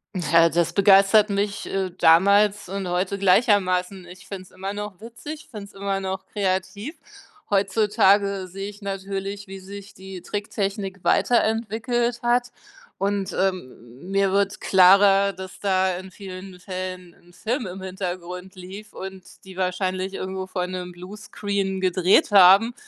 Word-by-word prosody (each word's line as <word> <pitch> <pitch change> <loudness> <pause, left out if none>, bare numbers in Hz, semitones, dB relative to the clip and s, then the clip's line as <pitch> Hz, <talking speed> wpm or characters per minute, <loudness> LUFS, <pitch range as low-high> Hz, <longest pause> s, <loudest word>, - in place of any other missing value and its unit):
Ja, 165 -2 +4
das 170 0 0
begeistert 200 +2 +5
mich, 200 0 -2
äh, 190 -2 -2
damals 200 +4 +4
und 195 -1 -4
heute 180 +3 -1
gleichermaßen. 190 -2 +2
Ich 185 +2 -14
finde 190 -2 -6
es - - -20
immer 190 +1 -6
noch 205 -1 -7
witzig, 235 +7 -9
finde 210 -3 -8
es 200 - -17
immer 195 0 -2
noch 190 0 -5
kreativ. 200 - -2 0.5
Heutzutage 200 -1 +2
sehe 195 +3 -6
ich 205 +1 -13
natürlich, 195 0 -5
wie 195 0 -9
sich 200 +1 -11
die 190 -1 -10
Tricktechnik 200 -1 -4
weiterentwickelt 235 +1 +1
hat 245 0 +1 0.5
und, 195 -1 -2
ähm, 160 -6 -4
mir 195 0 +1
wird 200 +1 0
klarer, 195 +1 +5
dass 190 0 -10
da 190 -2 +1
in 190 +1 -10
vielen 185 -1 -10
Fällen 185 -2 -6
'n 175 0 -23
Film 230 +5 -3
im 185 +1 -8
Hintergrund 185 0 -6
lief 190 +4 -10
und 190 0 -8 0.2
die 190 -1 -13
wahrscheinlich 185 +1 -2
irgendwo 190 0 -5
vor 180 -1 -3
'nem 180 -1 -6
Bluescreen 200 +1 -4
gedreht 185 +1 +3
haben 200 +4 +7
195 Hz, 140 wpm, -23 LUFS, 185-205 Hz, 0.5 s, haben